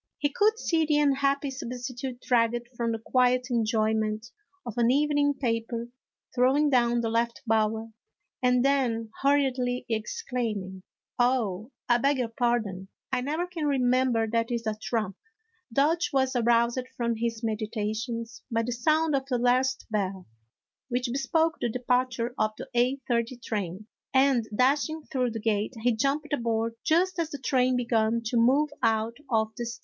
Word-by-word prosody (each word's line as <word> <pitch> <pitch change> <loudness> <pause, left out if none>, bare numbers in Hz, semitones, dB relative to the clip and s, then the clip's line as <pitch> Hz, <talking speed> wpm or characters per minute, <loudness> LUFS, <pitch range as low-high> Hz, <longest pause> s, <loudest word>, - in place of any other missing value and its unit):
He 290 - 0
could 430 +5 +3
see 330 -7 +1
the 300 -1 +3
unhappy 280 -1 +2
substitute 250 0 -6
dragged 240 0 +1
from 235 -1 -1
the 225 - -1
quiet 250 +2 +1
enjoyment 220 0 0 0.3
of 235 - -6
an 235 -1 +3
evening 290 +1 +2
paper, 230 -2 -2 0.4
throwing 270 +4 +3
down 240 -2 +3
the 225 - -1
left 235 +2 -1
bower, 220 0 0 0.5
and 250 0 +3
then 240 -5 +1
hurriedly 260 -3 +1
exclaiming: 220 - -3 0.2
" - - -38
Oh, 235 -4 +1 0.2
I 240 -1 +4
beg 280 +3 +2
your 245 -3 -1
pardon, 225 -5 -1 0.2
I 260 -1 +1
never 310 +7 -1
can 340 -4 -3
remember 255 -4 +2
that 230 +1 0
is 235 -2 -2
a 220 - 0
trump." 215 -2 -3 0.5
Dodge 310 +7 +2
was 265 -1 +1
aroused 235 +1 +2
from 235 -1 0
his 230 0 -2
meditations 225 +1 -3
by 230 -1 0
the 245 - -3
sound 310 +6 +2
of 270 0 -2
the 255 -3 0
last 255 +2 +1
bell, 190 -3 -2 0.6
which 245 0 -1
bespoke 320 +4 +1
the 240 - +1
departure 250 0 0
of 215 0 +1
the - - -7
eight 250 +3 +1
thirty 235 0 0
train, 210 -4 -4 0.3
and, 265 -4 +3
dashing 290 +6 +1
through 255 -2 +1
the 225 0 -5
gate, 215 +2 -1
he 245 - +4
jumped 285 +6 -1
aboard 230 -3 0
just 355 +3 +2
as 330 -2 0
the 285 - -5
train 255 -1 +1
began 230 -2 +1
to 235 +2 0
move 275 +6 +3
out 225 0 +1
of 220 -2 +2
the 240 - -3
station. 235 - -6
245 Hz, 160 wpm, -27 LUFS, 225-270 Hz, 0.6 s, I